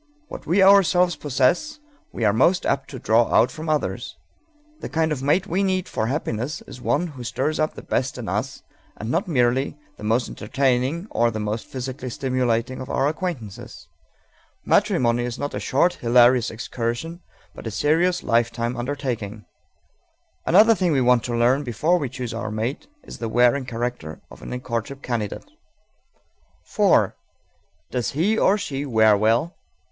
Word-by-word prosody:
What - - -9
we 190 +5 +4
ourselves 180 -3 +5
possess 145 - 0 0.3
we 115 - -2
are 105 - +4
most 175 - +3
apt 135 -1 -1
to 135 - -7
draw 115 0 +2
out 115 - +4
from 155 0 -6
others. 155 -1 -2 0.6
The - - -6
kind 160 0 0
of 140 -4 -2
mate 150 +7 +2
we 190 0 -1
need 185 -2 0
for 110 - -2
happiness 130 0 -3
is 125 - -11
one 145 +7 +1
who 140 -7 -8
stirs 135 +6 -2
up 155 0 0
the - - -9
best 130 0 -2
in 120 -4 -6
us, 110 +8 -3 0.3
and 110 +3 -4
not 180 +5 0
merely 130 -2 +1 0.2
the - - -12
most 115 +3 +1
entertaining 130 - -1
or 120 0 +2
the 110 -1 -4
most 105 +1 -3
physically 130 0 -6
stimulating 125 -1 -1
of 130 - -8
our 135 - +1
acquaintances. 150 - -5 0.8
Matrimony 120 -1 +2
is 120 -1 -4
not 145 - -4
a - - -3
short, 170 +7 +2
hilarious 120 0 +4
excursion, 120 +9 -4 0.3
but - - -9
a - - -1
serious 160 - +1
lifetime 120 +1 0
undertaking. 120 -5 -4 1.0
Another 215 +6 +6
thing 185 -6 +1
we 135 - +2
want 125 -1 +3
to 120 - -2
learn 125 +5 +3
before 150 +9 +1
we 140 -5 -3
choose 125 -2 -5
our 115 -1 -4
mate 110 +7 -3 0.2
is - - -10
the 115 - -3
wearing 125 +4 +3
character 120 -10 -4
of - - -13
any 125 - -5
courtship 125 +2 -5
candidate. 115 -5 -3 1.3
_4. - - +4 0.8
Does 125 -4 -2
he, 180 +10 +1
or 205 -2 +3
she, 140 -8 -4
wear 110 -5 +4
well? 115 - +1
130 Hz, 165 wpm, -23 LUFS, 115-155 Hz, 1.3 s, Another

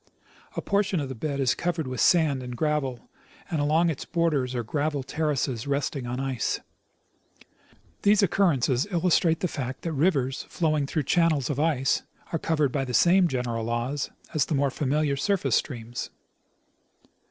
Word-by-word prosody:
A - - -3
portion 200 -3 +1
of 140 -3 -3
the - - -4
bed 140 +3 -3
is 130 -2 +3
covered 170 -2 -2
with 130 -1 -3
sand 155 -6 +4
and 125 -1 -6
gravel, 145 -5 -1 0.4
and 160 -3 0
along 160 +3 +3
its 145 - -5
border 160 -6 +1
are 120 - -1
gravel 145 +4 -1
terraces 140 -5 -1
resting 140 -2 -1
on 125 +1 -3
ice. 135 -3 -1 1.4
These 205 0 +4
occurrences 150 -8 +2
illustrate 170 -2 +2
the 180 - +1
fact 130 -5 -5
that 165 - -2
rivers 140 -4 +1
flowing 155 -4 0
through 155 +1 -1
channels 155 -2 +2
of 145 - -3
ice 145 -4 +2 0.3
are 165 - +1
governed 150 -4 +1
by 135 0 0
the 125 -2 -3
same 180 +5 +5
general 125 -5 -2
laws 120 +5 -2 0.2
as 155 - +2
the 155 - 0
more 140 0 +1
familiar 145 +1 0
surface 140 - +1
streams. 120 -3 -4
145 Hz, 160 wpm, -26 LUFS, 130-160 Hz, 1.4 s, same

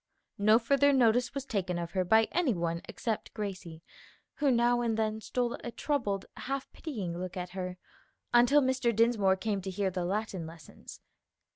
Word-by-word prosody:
No 215 +2 +6
further 280 +4 +3
notice 245 -1 +3
was 275 -1 -3
taken 185 -7 -2
of 170 0 -4
her 185 -2 0
by 220 +5 +5
any 325 - +1
one 170 -1 -2
excerpt 225 -3 -3
Gracie, 180 -6 -6 0.5
who 290 -2 +2
now 240 -1 +3
and 230 -2 0
then 220 0 -1
stole 245 +1 -1
a - - -4
troubled, 230 -7 -2
half 275 0 -4
pitying 205 - -5
look 180 +1 -5
at 180 0 -5
her, 185 -1 -5 0.6
until 245 +4 +6
Mr 260 -3 +1
Dinsmore 220 -4 +3
came 200 0 -2
to 190 - -5
hear 190 0 -1
the 180 -1 -2
Latin 190 -2 -2
lessons. 160 -3 -12
215 Hz, 170 wpm, -30 LUFS, 185-245 Hz, 0.6 s, No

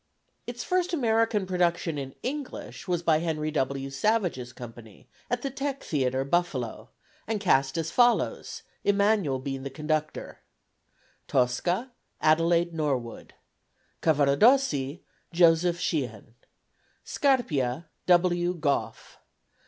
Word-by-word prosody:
Its 240 0 -5
first 365 0 0
American 225 - +2
production 175 -4 0
in 135 -1 -7
English 275 -5 -6
was 175 -2 -1
by 160 -2 +3
Henry 155 -2 -2
W. 135 -1 -2
Savage's 165 - 0
company, 115 -4 -12 0.2
at 245 0 -1
the 275 - -2
Teck 275 +1 -4
Theatre, 130 -3 0
Buffalo, 140 -7 -1 0.4
and 220 -1 -1
cast 135 -8 +2
as 165 0 -2
follows, 245 +3 +1 0.2
Emanuel 200 -8 +2
being 135 0 -5
the 135 - -5
conductor: 155 +2 -3 0.9
Tosca 175 - 0 0.3
ADELAIDE 165 +2 +3
NORWOOD. 135 -7 -3 0.7
Cavaradossi 150 - +3 0.3
JOSEPH 170 0 +4
SHEEHAN. 120 - -3 0.7
Scarpia 165 - 0 0.2
W. 175 0 +3
GOFF. 150 -4 -2
165 Hz, 105 wpm, -27 LUFS, 135-205 Hz, 0.9 s, JOSEPH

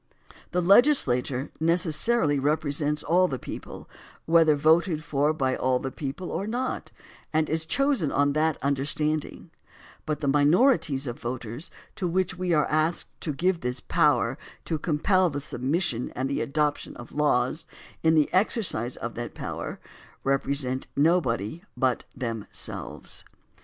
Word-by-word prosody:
The 180 - 0
legislature 150 - +4
necessarily 165 0 +2
represents 150 +1 0
all 180 +3 +3
the 135 - -3
people, - - -8 0.4
whether 160 -2 +5
voted 160 +2 +3
for 150 -1 +1
by 135 -4 0
all 130 0 +1
the 130 +1 -4
people 150 +7 -5
or 200 - -3
not, 250 +3 -3 0.4
and 155 0 +1
is 160 0 -1
chosen 275 - +1
on 145 0 +2
that 155 0 +1
understanding, 145 +2 -2 0.6
but 155 -1 -1
the 145 - -2
minorities 145 - +3
of 120 -2 -5
voters 120 +4 -5 0.3
to 180 - -1
which 180 +1 0
we 180 0 -2
are 150 -3 +3
asked 155 +2 0
to 155 - -2
give 175 +5 0
this 125 -1 -3
power - - +2 0.3
to 160 - -2
compel 180 +4 +2
the 145 -2 -4
submission 135 -1 -1
and 130 +1 -1
the 140 - -1
adoption 150 +1 -1
of 120 - -11
laws, 145 0 +1 0.3
in 160 0 +4
the 150 -2 +4
exercise 185 - +1
of 115 - -5
that 120 0 -6
power - - -5 0.4
represent 135 -1 -1
nobody 145 - +1 0.2
but 130 -3 0
them 115 -4 -4
selves. - - -3
150 Hz, 140 wpm, -26 LUFS, 135-170 Hz, 0.6 s, whether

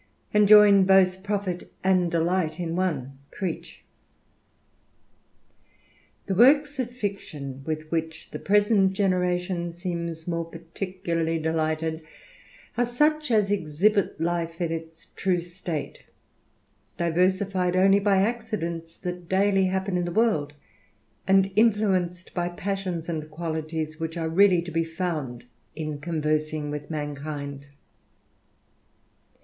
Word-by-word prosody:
And 210 -1 +5
join 205 -2 +8
both 190 -1 +4
profit 200 -3 -3
and 185 -2 +3
delight 170 0 0
m 170 -1 -2
one." 140 -8 -2
Crebch. 185 -5 -5 2.4
'T'HE 195 - -1
works 285 +5 +5
of 250 -2 -1
fiction, 175 - -5
with 155 0 -4
which 160 -1 -3
the - - -5
present 205 -1 +3
generation 180 -2 0
^ - - -7
seems 170 -1 -5
more 170 -1 -1
particularly 165 0 -3
delighted, 160 0 -1 0.8
are 245 - +4
such 300 +5 +1
as 210 -4 +2
exhibit 195 +2 +1
life 165 0 -2
in 170 -2 -1
its 165 0 -6
true 185 -2 -1
state, 175 -3 -5 1.0
diversified 185 +2 +1
only 195 +2 +5
hy 195 -1 +3
accidents 190 -8 -3
that 180 -2 -6
daily 195 0 +3
happen 190 0 -1
in 175 - 0
the 175 - -3
world, 170 -9 +1 0.7
and 195 0 +4
influenced 195 -5 +1
by 175 -1 -1
passions 185 -2 -3
and 155 -2 -4
qualities 160 -1 -4
which 165 +1 -4
are 160 -1 -2
really 180 0 +4
to 175 - -7
be 165 0 +1
found 160 -8 -4 0.3
in 155 -2 -4
conversing 155 -1 -1
with 145 0 -6
mankind. 145 -2 -5
175 Hz, 120 wpm, -26 LUFS, 160-195 Hz, 2.4 s, join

